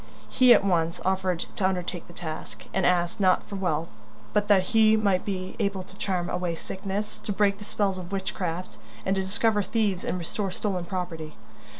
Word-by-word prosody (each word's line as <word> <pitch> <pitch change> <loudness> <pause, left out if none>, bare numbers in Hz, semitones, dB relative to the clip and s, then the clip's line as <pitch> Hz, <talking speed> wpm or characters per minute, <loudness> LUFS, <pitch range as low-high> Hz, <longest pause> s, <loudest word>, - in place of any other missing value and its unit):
He 255 -1 +5
at 235 - +7
once 170 -3 +1
offered 185 -2 0
to 190 -4 +3
undertake 180 -2 -3
the - - -12
task, 155 -10 -7
and 190 0 +2
asked, 175 +2 +1
not 185 -2 +4
for 200 - -6
wealth, 170 -4 -1 0.4
but 205 0 +2
that 195 -3 +5
he 220 -1 +6
might 200 -4 +2
be 185 -2 -3
able 200 -3 0
to 190 - -13
charm 180 -3 -1
away 180 -2 -1
sickness, 195 +4 -4
to - - -4
break 200 0 +2
the 205 - -8
spells 195 -3 0
of 180 0 -8
witchcraft, 185 -2 -3 0.3
and 190 - +2
to 190 - +1
discover 205 +3 +2
thieves 205 -3 0
and - - -1
restore 190 +3 -2
stolen 185 -1 -2
property. 175 -4 -4
190 Hz, 190 wpm, -27 LUFS, 175-200 Hz, 0.4 s, at